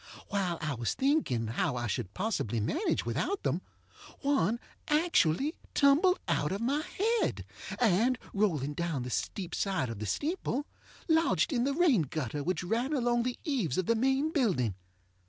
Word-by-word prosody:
While 190 -4 0
I 150 -2 -1
was 120 -3 -2
thinking 270 - +1
how 115 +4 -1
I 120 -1 -2
should 105 -3 -3
possibly 185 - -1
manage 330 - 0
without 400 - -1
them, - - 0 0.6
one 235 - +2 0.3
actually 300 - +2 0.2
tumbled 300 +7 +5
out 150 - +1
of 195 - -2
my 270 +6 +1
head, 450 +8 0 0.3
and, 235 +3 +3 0.2
rolling 160 -9 +1
down 165 -5 -2
the 125 - -5
steep 165 - -3
side 185 - 0
of 110 - -7
the 110 - -4
steeple, 295 - -1 0.4
lodged 320 0 +3
in 240 -1 +1
the 280 - +1
rain 310 - +4
gutter 145 -1 -3
which 180 +3 -1
ran 235 +10 0
along 240 -3 +2
the 245 +1 -2
eaves 245 - -1
of 185 - +1
the 230 - +3
main 265 +6 +1
building. 185 - +1
220 Hz, 160 wpm, -30 LUFS, -, 0.6 s, tumbled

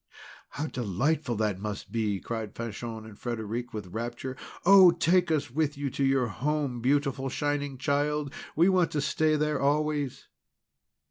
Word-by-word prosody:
"How 145 - -4
delightful 125 - -1
that 105 -3 0
must 105 0 -5
be!" 105 -4 0
cried 110 -1 -5
Fanchon 115 -1 -5
and 110 -2 -11
Frederic, 120 0 -4
with 100 -5 -7
rapture. 120 +3 -4 0.3
"Oh! 190 -1 +9
take 170 +1 +3
us 150 -6 0
with 150 +1 0
you 140 -1 -2
to 140 +1 -1
your 135 -1 +3
home, 135 +2 -2
beautiful 135 0 +1
Shining 145 0 -2
Child! 145 +1 0 0.2
We 170 +3 +5
want 185 -3 +3
to 150 - 0
stay 155 +2 +2
there 150 -1 0
always!" 145 -1 0
135 Hz, 150 wpm, -28 LUFS, 115-150 Hz, 0.3 s, Oh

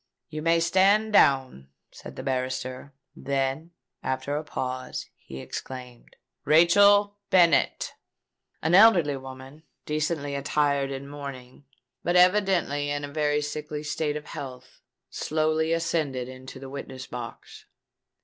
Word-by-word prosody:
"You 155 -1 -5
may 165 +1 +3
stand 195 +6 +3
down," 130 - +3 0.2
said - - -11
the - - -7
barrister: 130 +1 -3 0.2
then, 135 +4 -2 0.3
after 130 +2 -2
a 150 - -2
pause, 130 -3 -4
he 65 - -11
exclaimed, 125 - -8 0.3
"Rachel 200 +6 +5
Bennet!" 170 -6 +3 0.7
An 160 +2 +1
elderly 180 -8 +6
woman, 135 +2 -10 0.2
decently 150 -1 -2
attired 140 0 0
in 135 0 -6
mourning, 140 -2 -9 0.4
but 175 - 0
evidently 180 -6 +3
in 145 0 -2
a 145 - -10
very 150 -1 +1
sickly 150 0 -5
state 150 0 -2
of 150 - -9
health, 130 -3 -9 0.3
slowly 155 +1 0
ascended 160 -6 -1
into 130 +1 -10
the 135 - -9
witness 130 -1 -7
box. 120 -1 -9
145 Hz, 120 wpm, -26 LUFS, 130-165 Hz, 0.7 s, elderly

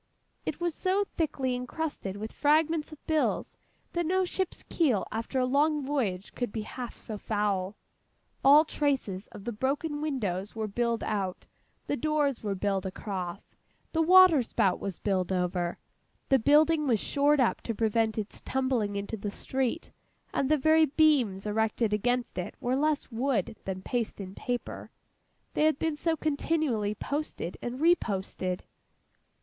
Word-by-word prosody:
It - - -2
was 345 -1 0
so 385 +4 +1
thickly 270 -5 0
encrusted 250 -5 -4
with 215 +2 -6
fragments 310 +1 +2
of 310 - -13
bills, 315 -1 0 0.4
that 345 - 0
no 370 +3 +2
ship's 375 0 -3
keel 265 - +1
after 225 +4 -3
a 255 - +3
long 290 +2 +2
voyage 215 -10 -2
could 245 -4 -3
be 220 0 -3
half 245 +2 -7
so 215 -2 -6
foul. 205 -2 -1 0.7
All 290 +3 +8
traces 265 -11 -1
of 200 - -11
the 240 - -3
broken 285 +6 -1
windows 210 - -2
were 220 -1 -2
billed 235 +2 -1
out, 195 -4 -2 0.4
the - - -1
doors 295 -1 +1
were 205 -2 -2
billed 195 0 -1
across, 185 -1 -5 0.4
the 325 - +1
water 365 -3 +7
spout 215 -5 +1
was 195 -4 -4
billed 190 -3 0
over. 180 -1 -1 0.5
The 270 - +5
building 300 +4 +4
was 230 -5 +3
shored 290 +4 +2
up 250 - +2
to 230 - -3
prevent 225 0 +1
its 215 -1 -4
tumbling 255 -6 0
into 200 +2 -3
the 205 0 -4
street; 265 +8 -2 0.4
and 270 - +1
the 310 - +4
very 315 +2 +5
beams 265 -10 +3
erected 220 +1 +1
against 245 +1 0
it 180 - -5
were 250 +1 0
less 295 0 0
wood 230 -3 0
than 190 -1 -4
paste 240 -4 -2
and 190 -1 -7
paper, 245 -1 -4 0.6
they 305 - +2
had 310 -2 +3
been 320 -1 -1
so 320 +2 0
continually 285 -8 0
posted 280 - -4
and 245 +2 -4
reposted. 195 - +1
245 Hz, 155 wpm, -29 LUFS, 205-300 Hz, 0.7 s, All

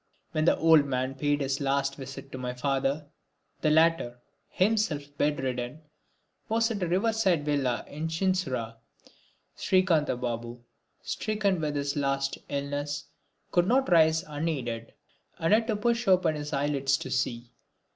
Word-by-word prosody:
When 155 -1 0
the - - +4
old 160 -3 +6
man 130 -1 -1
paid 145 +2 0
his 135 +1 -1
last 140 0 0
visit 135 0 -8
to 130 - -6
my 125 -1 -4
father, 135 +3 0 0.6
the 155 - +3
latter, 160 -6 +3 0.3
himself 180 -9 0
bed 145 0 +1
ridden, 125 +2 -3 0.7
was 230 +1 +2
at 205 -3 -3
a 180 - 0
river 195 +7 +1
side 185 -9 +1
villa 135 -5 0
in 155 +3 -4
Chinsurah. 160 -10 -1 0.8
Srikantha 170 -8 +2
Babu, 120 0 -4 0.4
stricken 205 -5 -1
with 150 -1 -2
his 140 0 -1
last 135 -1 -1
illness, 145 +1 -3 0.4
could 175 0 +3
not 260 -1 +2
rise 160 -1 +5
unaided 145 -7 -3 0.5
and 165 +5 +2
had 225 +1 +3
to 220 - +1
push 235 +2 0
open 180 -4 +4
his 150 -1 -5
eyelids 140 -1 +1
to 130 - -7
see. 120 -2 -2
145 Hz, 145 wpm, -28 LUFS, 135-175 Hz, 0.8 s, old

